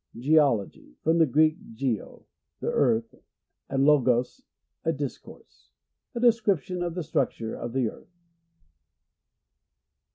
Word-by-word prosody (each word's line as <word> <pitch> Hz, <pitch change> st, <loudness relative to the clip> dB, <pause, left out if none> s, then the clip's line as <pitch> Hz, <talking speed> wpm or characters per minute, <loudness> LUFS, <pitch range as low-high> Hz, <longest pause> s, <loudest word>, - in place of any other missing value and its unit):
Geology. 130 Hz, -, +1 dB
— -, -, -57 dB
From 165 Hz, +2 st, +2 dB
the 160 Hz, -, +5 dB
Greek, 155 Hz, +4 st, +3 dB, 0.2 s
gc, 120 Hz, -4 st, -3 dB, 0.4 s
the -, -, -2 dB
earth, 115 Hz, 0 st, +1 dB, 0.6 s
and 135 Hz, 0 st, +1 dB
lopos, 125 Hz, -4 st, +2 dB, 0.4 s
a 165 Hz, -, +1 dB
discourse. 65 Hz, -, -8 dB, 0.5 s
A -, -, -2 dB
description 205 Hz, -, +2 dB
of 175 Hz, -1 st, -3 dB
the 180 Hz, -, -3 dB
structure 115 Hz, -6 st, -2 dB
of 120 Hz, -, -6 dB
the 130 Hz, -3 st, +1 dB
earth. -, -, -10 dB
140 Hz, 120 wpm, -26 LUFS, 120-160 Hz, 0.6 s, the